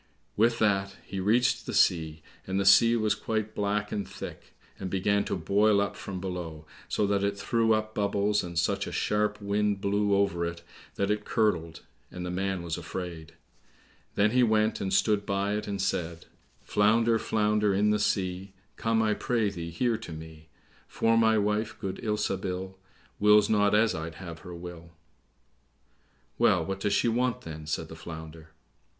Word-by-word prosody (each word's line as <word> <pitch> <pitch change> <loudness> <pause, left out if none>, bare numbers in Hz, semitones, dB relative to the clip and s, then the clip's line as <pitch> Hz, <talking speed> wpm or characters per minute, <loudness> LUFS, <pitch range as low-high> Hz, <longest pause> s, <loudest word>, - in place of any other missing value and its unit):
With 115 +2 +3
that 100 -3 +1
he 95 - -5
reached 115 +6 +2
the - - -3
sea, 80 -3 +2 0.2
and 95 +1 -1
the 100 - 0
sea 115 +4 +7
was 110 -2 +2
quite 110 -1 -3
black 105 0 -1
and 100 - -3
thick, - - -10 0.2
and 95 - -4
began 100 +2 +1
to - - -2
boil 100 +4 +3
up 100 0 -1
from 95 -2 -6
below, 85 -4 -6 0.2
so 105 - +1
that 100 0 +1
it 100 0 0
threw 115 +3 +2
up 110 0 -3
bubbles, 105 0 +1
and 85 -1 -6
such 85 - 0
a - - -5
sharp 105 0 0
wind 100 0 0
blew 100 +1 +1
over 100 -3 +1
it 85 0 -4 0.3
that 100 +1 0
it 105 0 -1
curdled, 85 -9 0 0.3
and 90 0 -7
the 90 - -3
man 95 -1 -2
was 85 0 -3
afraid. 85 -1 -7 0.8
Then 105 +1 +3
he 125 +1 +3
went 110 -2 +2
and 95 - -2
stood 100 +2 +2
by 100 0 -1
it, 105 0 -3
and 100 -1 -3
said, 85 -3 -2 0.4
"Flounder, 115 +2 +3
flounder 105 -1 +1
in 105 +2 +2
the 105 - +1
sea, 95 -2 -1 0.2
Come, 115 0 +1
I 110 -1 +2
pray 110 -2 0
thee, 85 -3 -6
here 115 +7 0
to 110 -6 -9
me; 80 0 -10 0.4
For 115 0 +1
my 110 -1 +4
wife, 105 +2 0
good 95 -3 -4
Ilsabil, 95 -3 -2 0.4
Wills 105 0 +5
not 105 -1 +3
as 110 +1 +3
I'd 80 0 -5
have 85 -2 -8
her 90 +2 -9
will." 85 -1 -10 1.5
"Well, - - +3
what 95 0 -4
does 100 0 0
she - - +2
want, 120 0 0
then?" 80 -1 -8
said 80 +1 -2
the 80 - -10
Flounder. 80 -1 -9
100 Hz, 175 wpm, -28 LUFS, 90-105 Hz, 1.5 s, sea